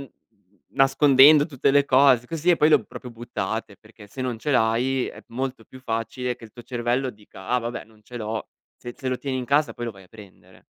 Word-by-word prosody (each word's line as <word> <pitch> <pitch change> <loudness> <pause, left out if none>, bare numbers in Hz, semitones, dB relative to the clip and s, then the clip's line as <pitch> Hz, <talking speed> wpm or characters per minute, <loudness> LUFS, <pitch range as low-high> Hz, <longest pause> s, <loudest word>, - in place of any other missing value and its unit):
n 135 - -13 0.6
nascondendo 140 +2 +5
tutte 140 -3 0
le 140 0 +3
cose 130 -3 +4
così, 165 +4 0
e 175 - +4
poi 150 - +4
le 155 - +6
ho - - +2
proprio 125 - -10
buttate, 110 -2 -5
perché 110 -1 -16
se 130 +6 -10
non 125 -3 -3
ce 150 - -3
l'hai 125 +1 +1
è - - -10
molto 130 -1 -5
più 130 - -14
facile 120 +1 -3
che 115 - -14
il 110 - -13
tuo 120 - -12
cervello 120 +2 -2
dica: 105 -4 -13
"Ah 125 - +2
vabbè, 120 +1 -5
non 110 -1 -24
ce 120 +3 -11
l'ho." 110 0 -4 0.3
Se 120 0 -8
se 130 - -5
lo 130 - -1
tieni 135 -2 -3
in 125 - -4
casa 145 +2 +2
poi 120 - -5
lo 115 - -3
vai 95 -2 -16
a - - -22
prendere. 105 -2 -17
125 Hz, 235 wpm, -24 LUFS, 115-135 Hz, 0.6 s, le